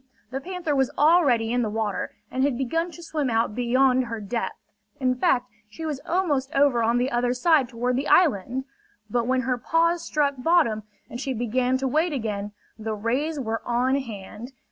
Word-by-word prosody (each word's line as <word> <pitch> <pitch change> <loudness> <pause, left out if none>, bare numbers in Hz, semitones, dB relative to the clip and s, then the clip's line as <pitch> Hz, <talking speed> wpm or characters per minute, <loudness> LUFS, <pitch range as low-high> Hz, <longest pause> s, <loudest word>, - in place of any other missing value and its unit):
The 270 +1 -3
panther 355 -3 -3
was 265 -2 +2
already 280 -8 +4
in 245 - +2
the 220 - 0
water, 210 -2 -2 0.2
and 260 - 0
had 275 -3 +1
begun 325 +7 -1
to 345 0 -11
swim 300 -5 -2
out 225 -1 +1
beyond 255 +2 +2
her 230 -1 -5
depth. 215 +3 -3 0.4
In 255 -2 +2
fact, 245 0 +2 0.2
she 320 +10 -7
was 300 -4 -3
almost 300 -7 0
over 275 -4 +4
on 230 +1 +2
the 250 +2 0
other 245 +1 +1
side 285 -1 +3
toward 245 +1 -1
the 275 - -2
island. 265 - +3 0.5
But 240 0 0
when 260 0 +2
her 250 0 -1
paws 335 +5 +2
struck 290 -3 +1
bottom 250 -8 +3 0.3
and 240 - -7
she 270 -2 -2
began 250 +3 +1
to 265 0 -1
wade 315 +5 +1
again, 210 -5 -3 0.3
the 220 0 -3
rays 265 +9 -1
were 225 -3 -2
on 245 +2 +1
hand. 235 -1 -5
255 Hz, 190 wpm, -25 LUFS, 235-285 Hz, 0.5 s, already